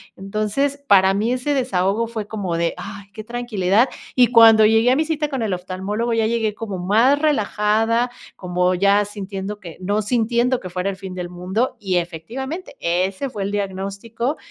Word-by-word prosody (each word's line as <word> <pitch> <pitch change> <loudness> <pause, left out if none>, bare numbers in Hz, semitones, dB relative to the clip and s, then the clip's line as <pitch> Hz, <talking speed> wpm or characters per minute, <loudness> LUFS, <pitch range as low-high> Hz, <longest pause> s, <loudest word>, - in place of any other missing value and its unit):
entonces, 215 +9 -2
para 190 -1 +5
mí 215 +5 0
ese 255 +3 -1
desahogo 230 -4 0
fue 225 -2 -5
como 195 -6 -3
de: 170 0 0
"Ay 200 -1 -8
qué 215 0 -8
tranquilidad", 235 -1 +1 0.3
y 250 -1 +6
cuando 225 -2 +7
llegué 225 +3 +4
a - - +4
mi 310 - +2
cita 310 -1 -1
con 270 -4 -3
el 210 -4 -1
oftalmólogo 190 +6 -3
ya 225 -1 +2
llegué 220 -2 0
como 215 -4 -5
más 225 +10 +3
relajada, 225 -4 +1 0.3
como 180 0 0
ya 200 +2 +3
sintiendo 200 0 -6
que, 170 -5 -10
no 205 +3 0
sintiendo 240 +3 +1
que 185 - -7
fuera 180 +2 -2
el 195 - -4
fin 190 -1 -8
del 180 -1 -4
mundo 185 +8 -2
y 185 -3 0
efectivamente 235 - -5
ese 185 +9 -1
fue 205 -5 -5
el 200 - -3
diagnóstico, 205 +6 -3
210 Hz, 180 wpm, -21 LUFS, 190-240 Hz, 0.3 s, cuando